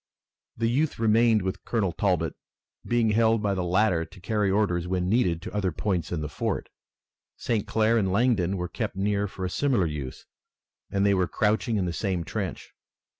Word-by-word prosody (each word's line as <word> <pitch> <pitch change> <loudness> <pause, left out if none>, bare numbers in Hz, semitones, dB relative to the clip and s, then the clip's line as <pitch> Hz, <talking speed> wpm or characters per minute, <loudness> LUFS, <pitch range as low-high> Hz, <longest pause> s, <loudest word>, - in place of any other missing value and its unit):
The 115 0 +1
youth 140 +6 +1
remained 110 -1 +3
with 95 0 -3
Colonel 105 -6 0
Talbot, 85 -4 0 0.5
being 120 -2 +2
held 110 0 +3
by 100 -1 +1
the 95 -2 -1
latter 90 -1 +2
to 95 +4 -13
carry 105 +1 0
orders 95 -4 +1
when 90 0 -1
needed 90 -6 +1
to - - -7
other 100 -3 0
points 90 -1 -2
in 85 -3 -2
the 75 - -3
fort. 75 - -3 0.7
St. 110 -4 -1
Clair 110 +1 +2
and 95 -3 0
Langdon 100 -4 +2
were 90 0 -2
kept - - -4
near 100 +1 0
for 95 -1 -6
a - - -2
similar 130 -9 +2
use 75 -5 -5 0.6
and 100 0 +1
they 100 - +4
were 95 -2 +2
crouching 110 +2 +1
in 95 - 0
the 85 - -2
same 90 -1 -1
trench. - - -5
100 Hz, 185 wpm, -26 LUFS, 90-110 Hz, 0.7 s, they